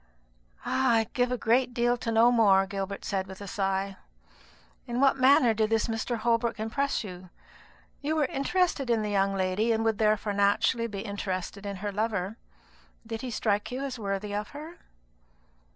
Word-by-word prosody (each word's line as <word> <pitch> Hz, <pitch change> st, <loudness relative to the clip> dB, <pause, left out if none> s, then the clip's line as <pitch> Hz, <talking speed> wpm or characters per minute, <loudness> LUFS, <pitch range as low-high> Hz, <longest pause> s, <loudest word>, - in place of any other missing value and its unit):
"I 245 Hz, -4 st, +3 dB
would 220 Hz, -, -8 dB
give 245 Hz, 0 st, +1 dB
a 250 Hz, -, 0 dB
great 245 Hz, +2 st, +1 dB
deal 240 Hz, 0 st, +2 dB
to 235 Hz, -1 st, -4 dB
know 230 Hz, +2 st, +5 dB
more," 200 Hz, -5 st, +5 dB
Gilbert 195 Hz, 0 st, -5 dB
said 190 Hz, -1 st, -2 dB
with 190 Hz, 0 st, -10 dB
a 200 Hz, -, -7 dB
sigh. 195 Hz, -1 st, -2 dB, 0.9 s
"In 240 Hz, +1 st, -2 dB
what 275 Hz, 0 st, +4 dB
manner 260 Hz, -3 st, +5 dB
did 215 Hz, 0 st, +1 dB
this 225 Hz, -1 st, +2 dB
Mr. 225 Hz, +1 st, -2 dB
Holbrook 230 Hz, 0 st, 0 dB
impress 260 Hz, +5 st, -1 dB
you? 185 Hz, -2 st, -9 dB, 0.7 s
You 300 Hz, +2 st, -1 dB
were 305 Hz, -2 st, +2 dB
interested 280 Hz, 0 st, 0 dB
in 225 Hz, -2 st, +2 dB
the 210 Hz, -, -2 dB
young 195 Hz, 0 st, +1 dB
lady, 190 Hz, +4 st, +1 dB
and 225 Hz, 0 st, +1 dB
would 225 Hz, -1 st, +1 dB
therefore 215 Hz, -1 st, +1 dB
naturally 205 Hz, +4 st, +2 dB
be 200 Hz, -3 st, -6 dB
interested 200 Hz, -1 st, -4 dB
in 200 Hz, -, -4 dB
her 205 Hz, -, -1 dB
lover. 210 Hz, -1 st, -2 dB, 0.7 s
Did 225 Hz, 0 st, -5 dB
he 255 Hz, -, -4 dB
strike 210 Hz, -2 st, 0 dB
you 260 Hz, +2 st, -3 dB
as 260 Hz, -3 st, -5 dB
worthy 200 Hz, 0 st, -3 dB
of 210 Hz, +1 st, -2 dB
her?" 320 Hz, +4 st, -9 dB
225 Hz, 180 wpm, -28 LUFS, 200-240 Hz, 0.9 s, know